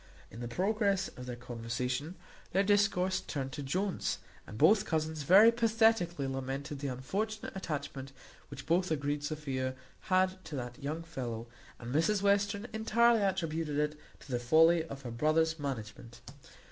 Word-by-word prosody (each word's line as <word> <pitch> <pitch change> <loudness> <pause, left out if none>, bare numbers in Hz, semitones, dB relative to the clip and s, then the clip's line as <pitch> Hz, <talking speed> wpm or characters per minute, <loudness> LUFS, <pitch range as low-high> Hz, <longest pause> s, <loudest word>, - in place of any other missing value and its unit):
In 115 - -10
the 120 - -4
progress 195 - +1
of 125 0 -10
their 125 - -4
conversation 125 +6 -4 0.4
their 195 +2 +4
discourse 200 -2 +2
turned 135 -3 -4
to 145 - -5
Jones, 185 +7 -1 0.3
and 105 - -8
both 195 - +5
cousins 160 -4 -2
very 195 +10 +7
pathetically 225 -9 +2
lamented 135 +2 -4
the 140 - -3
unfortunate 195 - -3
attachment 140 -6 -5 0.4
which 140 -1 -9
both 180 +3 +2
agreed 145 -1 -1
Sophia 135 -4 -3 0.3
had 185 0 +2
to 155 - -6
that 125 +1 -6
young 155 +4 -3
fellow; 120 -8 -5 0.3
and 120 +1 -7
Mrs 190 +7 +2
Western 200 +1 +2
entirely 225 +1 +3
attributed 165 -6 -1
it 150 0 0 0.3
to 135 - -12
the 120 - 0
folly 160 +7 +5
of 140 -4 -9
her 120 - -5
brother's 160 +5 +1
management. 120 -3 -6
155 Hz, 150 wpm, -32 LUFS, 135-190 Hz, 0.4 s, very